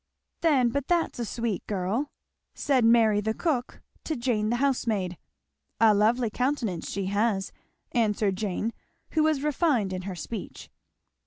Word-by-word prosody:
"Then 275 -7 +4
but 280 +2 -2
that's 340 -7 +1
a 235 - -1
sweet 230 -3 -3
girl!" 210 +8 -1 0.5
said 270 -5 +2
Mary 225 -2 +5
the 220 +1 -1
cook 270 -8 -2 0.2
to 315 - -1
Jane 235 -4 0
the 240 - +1
housemaid. 230 -8 0 0.6
"A 220 -1 +6
lovely 220 +3 +2
countenance 245 - -1
she 195 -1 -2
has," 200 0 0 0.4
answered 210 -4 +1
Jane, 210 +3 -2 0.4
who 315 - +2
was 305 -3 +2
refined 285 - +1
in 185 - -3
her 185 - -5
speech. 220 +5 -7
230 Hz, 145 wpm, -27 LUFS, 205-270 Hz, 0.6 s, A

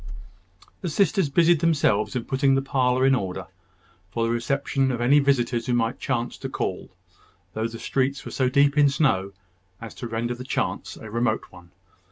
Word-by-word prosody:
The 175 - -3
sisters 195 0 +2
busied 170 +2 +4
themselves 145 -10 +1
in 120 - -2
putting 135 0 +2
the 135 - +2
parlour 130 -1 +1
in 135 - +5
order, 95 -8 -2 0.6
for 115 +3 -2
the 115 - 0
reception 135 +2 0
of 120 - -3
any 130 +5 +4
visitors 125 -4 +1
who 125 - +1
might 115 0 0
chance 120 -2 -2
to - - -5
call, - - -4 0.6
though 110 +1 -1
the 115 0 -8
streets 135 +3 -1
were - - -7
so 130 -2 +1
deep 140 +2 +3
in 145 -1 +6
snow 100 -10 +1 0.5
as 115 -3 -9
to 120 - -7
render 115 +1 -2
the 125 +1 -8
chance 130 - -3
a 110 - -10
remote 115 -1 -1
one. 90 -1 -15
125 Hz, 185 wpm, -24 LUFS, 115-140 Hz, 0.6 s, in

